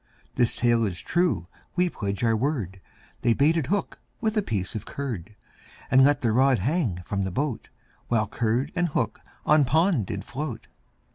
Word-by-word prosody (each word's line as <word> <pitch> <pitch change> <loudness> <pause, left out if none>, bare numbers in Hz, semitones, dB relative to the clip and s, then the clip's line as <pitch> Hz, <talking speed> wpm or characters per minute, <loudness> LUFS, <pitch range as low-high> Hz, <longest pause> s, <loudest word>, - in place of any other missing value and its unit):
This 120 - +2
tale 120 -1 +3
is 90 -5 -1
true 170 - +1 0.3
we 180 0 +3
pledge 100 - -3
our 115 -1 +3
word, 110 - -2 0.4
They 120 -2 +3
baited 155 0 +2
hook 200 +4 -1 0.2
with 220 -1 0
a 215 - +3
piece 100 - -2
of 110 - -4
curd, 110 -9 -5 0.6
And 130 +1 +7
let 145 0 +3
the 115 - +3
rod 130 +3 +4
hang 115 - -1
from 100 +1 -2
the 95 - -1
boat, 130 +5 -3 0.4
While 110 -2 +1
curd 115 +4 0
and 175 -1 +2
hook 150 - -1 0.3
on 150 -1 +5
pond 155 - +2
did 100 -2 -5
float. 135 -5 -5
125 Hz, 170 wpm, -26 LUFS, 105-150 Hz, 0.6 s, And